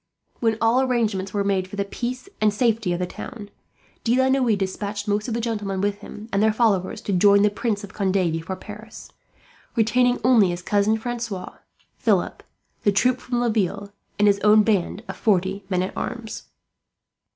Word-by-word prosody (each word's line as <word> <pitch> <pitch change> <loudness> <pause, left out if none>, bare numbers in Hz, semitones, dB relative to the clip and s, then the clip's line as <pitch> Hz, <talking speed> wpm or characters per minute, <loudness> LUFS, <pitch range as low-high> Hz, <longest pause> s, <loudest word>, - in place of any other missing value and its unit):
When 225 -2 +1
all 230 +3 +3
arrangements 220 -7 0
were 200 -1 0
made 195 -2 0
for 190 - -9
the 200 0 -1
peace 250 - -5
and 215 -1 +4
safety 220 -3 +1
of 175 - 0
the 180 - -1
town, 205 +3 -9 0.5
De 240 +2 +2
la 260 0 +3
Noue 255 -5 +3
despatched 205 +2 -3
most 210 +1 0
of 230 - -2
the - - -1
gentlemen 210 -4 -2
with 205 +1 -1
him, 210 +1 -10
and 200 - +2
their 220 0 +4
followers, 210 -3 +1
to 200 - -3
join 200 +2 +5
the 210 - +3
Prince 205 0 -2
of 200 - -9
Conde 195 -3 0
before 170 -1 -1
Paris; 210 +3 -11 0.6
retaining 245 +2 +3
only 235 -7 +5
his 175 0 -4
Cousin 205 +2 +2
Francois, 230 -5 -5 0.5
Philip, - - +1 0.4
the 205 - +3
troop 250 +5 +2
from 245 -1 -2
Laville, 205 -3 -1 0.3
and 205 +1 +4
his 200 -1 +4
own 210 +1 +5
band 205 0 0
of - - -6
forty 195 -1 +1
men 180 -2 +1
at 185 - -5
arms. 235 -3 -5
210 Hz, 185 wpm, -23 LUFS, 195-230 Hz, 0.6 s, join